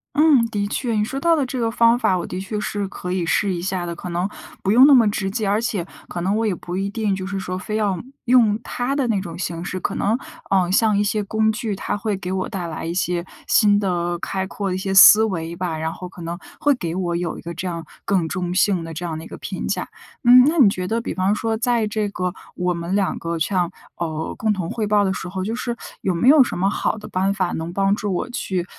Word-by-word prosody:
嗯， 295 -5 +5
的 205 -3 -2
确。 235 +3 -2
你 210 -1 +1
说 270 - -5
到 335 0 +4
的 285 - +1
这 255 +1 -5
个 230 -2 0
方 230 0 +4
法 190 -7 +2
我 175 - -4
的 185 - -5
确 210 +2 -4
是 205 -1 -2
可 180 -2 -5
以 180 -2 -1
试 195 +4 +1
一 175 - -3
下 185 -1 -2
的， 170 0 -4
可 180 - -7
能 175 +3 -1 0.3
不 195 - -2
用 250 +5 +8
那 290 - +7
么 235 -5 +6
直 195 -2 -2
接， 215 0 -1
而 205 +3 +2
且 205 -7 -2 0.2
可 175 - -4
能 190 +4 0
我 225 +1 0
也 210 - +1
不 175 0 -6
一 195 +1 -1
定 210 -2 -1
就 190 -1 -5
是 195 0 -3
说 185 -1 -4
非 215 +3 -3
要 205 -4 0 0.3
用 230 -4 +4
他 245 +2 -2
的 275 -3 0
那 210 -4 +1
种 170 -3 -7
形 170 -2 -3
式。 185 +1 -4
可 - - -2
能， 215 +4 +1 0.3
呃， 185 -2 +2
像 210 +2 +3
一 - - +3
些 210 +1 0
工 220 +2 +1
具， 220 -1 -3
它 - - -2
会 205 0 -2
给 185 -1 -6
我 185 0 -2
带 185 -5 -4
来 160 -1 -5
一 165 - -2
些 175 -1 -1 0.2
新 205 -2 +4
的 175 -3 -1
开 190 +1 -2
阔 200 +1 -4
的 180 - -1
一 - - -1
些 190 0 -2
思 210 +3 +9
维 170 -6 -2
吧， 170 -2 -3
然 160 +1 -3
后 180 - -8
可 180 - -12
能 170 +1 -4 0.2
会 290 - +3
给 170 -9 -4
我 175 -1 -1
有 170 -1 -2
一 - - -10
个 170 - -6
这 175 +3 -6
样 170 -2 -4 0.2
更 185 -5 +1
中 180 0 -3
性 185 -2 +2
的 165 0 -7
这 170 +3 -5
样 160 -2 -3
的 160 - -7
一 - - -10
个 - - -9
评 - - -5
价。 - - -2 0.4
嗯， 250 +1 +9
那 315 +4 +2
你 250 -9 +7
觉 185 -2 -3
得 230 - +1
比 230 - -4
方 190 +2 +1
说 225 +1 -1
在 235 -1 +1
这 210 0 -1
个 180 -2 -3 0.2
我 180 0 0
们 170 +1 -4
两 200 -2 0
个 170 0 -3
像 175 +1 0 0.2
呃， 160 -2 -4
共 220 0 +1
同 185 -5 -2
汇 220 - -2
报 205 0 +3
的 190 - +1
时 180 - -5
候， 190 +1 -4
就 225 +3 -2
是 240 -1 -3 0.2
有 190 - 0
没 170 +8 +1
有 285 0 +8
什 245 - -4
么 195 +2 +2
好 215 - -1
的 210 - -9
办 190 +2 0
法 185 -3 -1
能 165 +1 -4
帮 195 +2 +2
助 205 -2 -2
我 185 - -2
去， 190 -7 -2
195 Hz, 290 characters per minute, -21 LUFS, 180-220 Hz, 0.4 s, 思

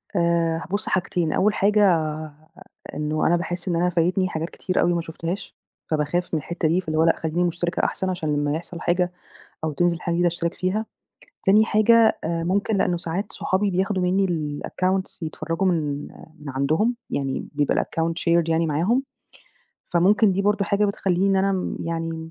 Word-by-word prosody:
آآ، 170 -1 +1
بُصّ 205 - -2
حاجتين، 175 -3 0
أول 210 +1 +3
حاجة 210 +1 +3 1.1
إنه 150 +1 0
أنا 175 - +4
باحس 175 +2 -3
إن 175 - +1
أنا 175 +2 +2
فايتني 180 +2 +1
حاجات 160 0 -3
كتير 185 - -1
أوي 175 0 +3
ما 170 - 0
شُفتهاش، 165 +3 -6 0.4
فباخاف 155 +4 -1
من - - +3
الحتّة 170 +2 -2
دي 175 +4 +2
فاللي 155 -3 -3
هو - - +5
لأ 165 - +4
خلّيني 165 +2 -1
مشتركة 175 +1 -1
أحسن 190 - -1
عشان 160 -5 -2
لمّا 145 0 0
يحصل 175 +1 -6
حاجة، 180 0 +1 0.5
أو 160 - 0
تنزل 175 +3 0
حاجة 170 - -1
جديدة 175 +1 +2
اشترك 170 0 -2
فيها، 195 +4 -1 0.6
تاني 210 +3 +5
حاجة 225 +1 +4
آآ 165 0 -1
ممكن 200 +4 +1
لأنه 180 -2 +1
ساعات 175 +5 -4
صحابي 195 +2 0
بياخدوا 190 +1 0
مني 190 +2 +2 0.4
الaccounts 185 +1 -1
يتفرّجوا 165 +3 -2
من 150 -5 -1 0.3
من 150 - -9
عندهم، 155 - +1
يعني 135 -1 -2
بيبقى 145 -1 +1
الaccount 165 0 -1
shared 170 -1 +3
يعني 165 +1 +2
معاهم، 175 - +1 0.8
فممكن 195 +4 +4
دي 195 +2 0
برضه 205 0 +2
حاجة 205 +1 +1
بتخلّيني 190 -2 0
إن 195 - +3
أنا 195 +1 +2
م 185 - -2
يعني، 165 -1 -4
175 Hz, 175 wpm, -23 LUFS, 165-190 Hz, 1.1 s, هو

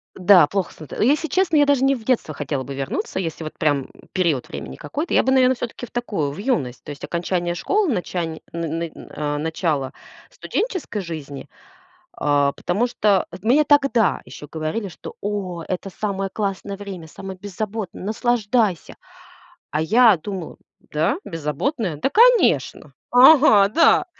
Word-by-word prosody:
Да, 180 -4 +6
плохо 195 0 -2
становится. 155 +5 -5
Если 300 +4 +2
честно, 350 -1 +2
я 290 - +6
даже 280 -2 +2
не 275 0 +4
в 235 - -9
детство 225 -10 0
хотела 140 -2 -3
бы 140 - -7
вернуться, 135 +6 -3
если 165 -3 -4
вот 155 - -6
прям 145 -4 +1 0.3
период 165 -9 0
времени 65 - -7
какой-то, 300 - -4
я - - +5
бы, 265 - +1
наверно, 260 -1 +5
всё-таки 245 0 -6
в - - -19
такую, 200 -12 -2
в 145 - -9
юность. 150 - -1
То - - -11
есть 145 - -10
окончание 175 0 -2
школы, 400 - +1
начани 175 -4 -3
н 165 -1 -3
н 170 -1 -4
на 145 0 -5
начало 155 -3 -2 0.4
студенческой 370 - -3
жизни, 150 -6 -7 0.7
а, 145 -1 +1
потому 200 +12 -1
что 210 -5 +1 0.2
мне 260 +8 +4
тогда 275 - +3
еще 130 +4 -10
говорили, 160 +7 -3
что: 175 - -10
"О, 195 -4 -3
это 185 +1 -4
самое 195 0 -3
классное 200 -1 -3
время, 195 -5 -8
самое 190 +3 -9
беззаботное, 205 +1 -5
наслаждайся". 220 -3 0 0.7
А 150 - -1
я 220 +4 +5
думала: 180 +1 -7 0.2
"Да, 160 - -1
беззаботное? 165 - -2
Да, 150 - 0
конечно! 475 - +3 0.2
Ага, 250 -6 +7
да". 325 +11 +4
195 Hz, 155 wpm, -22 LUFS, 160-240 Hz, 0.7 s, Ага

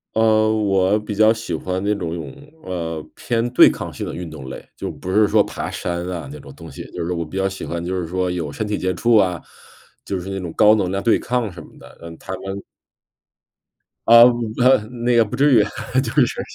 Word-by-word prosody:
呃， 110 -1 +3
我 100 -1 +2
比 105 0 -6
较 110 +2 +5
喜 110 -7 -5
欢 95 +4 -3
那 105 +1 +1
种 85 -5 -4
有， 85 -1 -5 0.5
呃， 80 -3 -4
偏 115 0 -1
对 125 - +8
抗 - - -5
性 - - -6
的 - - -6
运 90 -1 -6
动 75 -4 -10
类。 - - -8
就 - - -4
不 95 - -7
是 105 +2 +4
说 - - +4
爬 - - -5
山 85 0 -4
啊 90 -3 -5
那 - - -9
种 - - -12
东 - - -12
西， - - -8
就 85 - -5
是 85 - -3
我 85 -1 -3
比 80 - -11
较 95 0 0
喜 95 - -7
欢 85 0 -4
就 90 +1 -2
是 90 - -3
说， 90 +1 -1
有 85 -5 -3
身 110 +8 -4
体 105 - -2
接 95 0 -1
触 115 +6 +2
啊， 90 -4 +1 0.6
就 95 - -3
是 90 +2 -7
那 95 0 -4
种 85 -3 -6
高 105 +1 +5
能 95 -4 -1
量 95 +1 -2
对 115 - +3
抗 120 -4 -2
什 85 - -11
么 - - -19
的， - - -15
嗯， 85 0 -9
台 - - -9
湾 95 0 -5 1.4
呃 115 +1 +9 0.4
呃， 130 +2 +6 0.3
那 120 0 +3
个 115 - +6
不 105 - -6
至 140 0 +4
于， 110 -4 +6 0.4
就 - - -4
是 - - -4
95 Hz, 250 characters per minute, -20 LUFS, 85-110 Hz, 1.4 s, 呃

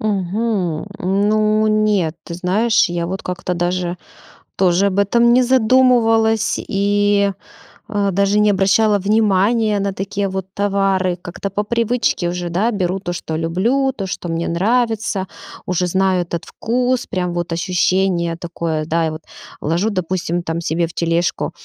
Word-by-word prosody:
Мгм. 200 -3 -1
Ну, 215 +3 +2
нет. 210 -6 +1
Ты 170 - -7
знаешь, 205 +6 +2
я 170 -1 -2
вот 190 +2 -4
как-то 180 0 -3
даже 175 0 -1 0.6
тоже 185 +1 +3
об 195 0 -1
этом 235 +4 +3
не 255 - +5
задумывалась 230 -3 +3
и, 200 0 +1 0.6
а, 205 -2 0
даже 200 +2 +2
не 210 0 +4
обращала 205 +2 +3
внимания 210 +1 +2
на 200 0 -1
такие 195 +1 -3
вот 190 -1 -4
товары. 195 -2 +1
Как-то 180 +3 -5
по 205 +2 -2
привычке 230 -5 0
уже, 175 0 -4
да, 205 +8 0
беру 190 -2 -1
то, 175 -1 -5
что 160 -2 -5
люблю, 225 +12 +1
то, 195 -7 -5
что 175 - -5
мне 165 0 -2
нравится, 215 +1 0 0.4
уже 180 0 0
знаю 190 0 +1
этот 170 -1 -5
вкус, 250 +2 -1
прям 180 -1 -3
вот 175 -1 -3
ощущение 175 0 0
такое, 165 -2 -3
да, 165 0 0
и - - -1
вот, 155 +1 -7 0.4
ложу, 170 +8 0
допустим, 180 -3 -2
там, 170 0 -3
себе 165 +1 0
в 170 - -13
тележку, 170 0 -1
195 Hz, 150 wpm, -18 LUFS, 175-215 Hz, 0.6 s, не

